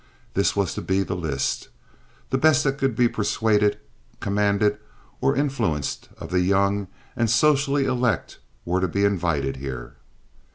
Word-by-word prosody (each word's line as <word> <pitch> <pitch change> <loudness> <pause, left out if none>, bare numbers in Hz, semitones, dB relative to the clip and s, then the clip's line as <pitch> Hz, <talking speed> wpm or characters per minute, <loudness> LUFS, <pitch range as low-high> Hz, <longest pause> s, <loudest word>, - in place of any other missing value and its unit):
This 100 - +1
was 100 -3 0
to - - -4
be 95 +1 +1
the 95 - -3
list. 75 -6 -2 0.6
The 130 - +1
best 155 -1 +4
that 135 0 0
could 135 -4 +1
be 120 +1 +4
persuaded, 105 -1 +1 0.4
commanded, 100 +1 +1 0.4
or - - +2
influenced 120 - -1
of - - -9
the 90 - +2
young 100 +2 +2 0.3
and 120 -3 +1
socially 140 +3 +3
elect 125 -6 -1 0.3
were 90 +2 0
to 95 - +2
be 100 +4 +1
invited 85 -9 0
here. 65 -3 -7
100 Hz, 150 wpm, -24 LUFS, 90-125 Hz, 0.6 s, best